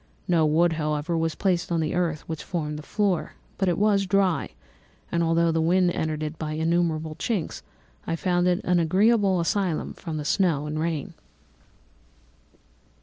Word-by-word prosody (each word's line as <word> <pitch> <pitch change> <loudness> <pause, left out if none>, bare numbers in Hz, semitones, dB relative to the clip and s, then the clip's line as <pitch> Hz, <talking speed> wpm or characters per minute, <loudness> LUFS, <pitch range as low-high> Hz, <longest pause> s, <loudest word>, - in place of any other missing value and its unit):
No 165 -4 +3
wood, 165 +2 +3
however, 155 +1 -1
was 165 -1 0
placed 180 -3 0
on 170 - +1
the 155 -1 -1
earth, 170 -4 0
which 160 -1 -5
formed 150 -4 -3
the - - -7
floor, 195 +1 -1 0.3
but 190 -2 +2
it 170 - 0
was 200 -1 +2
dry; 190 -2 +1 0.6
and 170 - +1
although 165 0 +2
the 165 0 +1
wind 180 +2 +3
entered 155 -2 -2
it 155 +1 -5
by 155 -1 -3
innumerable 160 -1 0
chinks, 210 -10 -2 0.5
I 165 - 0
found 175 +1 +1
it 180 -1 +2
an 180 -1 +2
agreeable 195 +3 +3
asylum 175 -1 -1
from 165 -3 -6
the 150 - -4
snow 160 -4 +1
and 150 +1 -3
rain. 160 -3 -2
170 Hz, 165 wpm, -25 LUFS, 155-180 Hz, 0.6 s, No